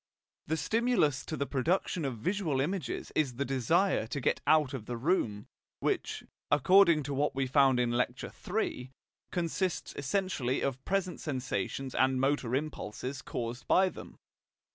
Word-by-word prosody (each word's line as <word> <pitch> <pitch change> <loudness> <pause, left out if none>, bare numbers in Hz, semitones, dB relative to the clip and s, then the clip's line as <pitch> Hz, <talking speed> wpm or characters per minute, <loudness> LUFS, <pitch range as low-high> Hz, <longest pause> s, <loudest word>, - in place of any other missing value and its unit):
The 160 - 0
stimulus 180 - +1
to 155 - -3
the 140 - 0
production 160 +4 0
of 130 -4 -3
visual 165 - -1
images 180 +7 -2
is 140 -6 0
the 140 +3 -1
desire 135 - +2
to 140 - -3
get 125 - 0
out 150 -4 +4
of 120 -6 -6
the 120 - -3
room, 115 - 0 0.3
which, - - -1 0.3
according 165 +2 +5
to 140 +1 -4
what 145 +1 0
we 135 0 +1
found 135 -1 +4
in 120 -1 +1
Lecture 125 +1 -1 0.2
III, 180 - -1 0.4
consists 175 +1 -1
essentially 145 -4 -1
of 130 -1 -2
present 190 -2 -1
sensations 130 - -3
and 130 0 +2
motor 135 -2 +1
impulses 135 -2 -4
caused 120 0 -5
by 190 0 +5
them. - - -11
140 Hz, 150 wpm, -31 LUFS, 130-170 Hz, 0.4 s, according